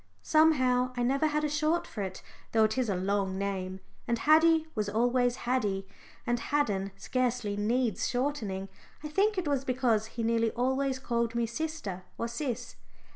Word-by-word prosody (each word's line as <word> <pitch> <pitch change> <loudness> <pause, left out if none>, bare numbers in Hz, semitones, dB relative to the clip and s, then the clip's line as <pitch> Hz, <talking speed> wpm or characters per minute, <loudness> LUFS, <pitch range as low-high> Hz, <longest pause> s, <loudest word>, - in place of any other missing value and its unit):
Somehow 255 -5 +3
I 245 - +1
never 275 +5 +2
had 300 0 0
a - - +2
"short" 305 +3 +1
for 215 - -6
it, 190 -1 -5 0.3
though 220 -1 +5
it 215 0 +2
is 255 -4 0
a 195 - +1
long 190 +1 0
name, 190 -1 -3 0.3
and 235 - +1
Haddie 320 +4 +5
was 210 -3 -1
always 245 +3 +2
Haddie, 210 -7 -1 0.4
and 240 0 0
"Haddon" 205 -11 0
scarcely 245 -5 -1
needs 225 +1 0
shortening. 240 -8 -2 0.4
I 300 - -4
think 400 +6 +2
it 360 -4 -1
was 280 -2 +1
because 245 -5 +1
he 230 - -1
nearly 230 0 +2
always 265 +2 0
called 235 -2 -1
me 235 0 +1
Sister 235 - -4 0.2
or 230 - -2
"Sis." 240 +1 -4
245 Hz, 170 wpm, -30 LUFS, 210-275 Hz, 0.4 s, though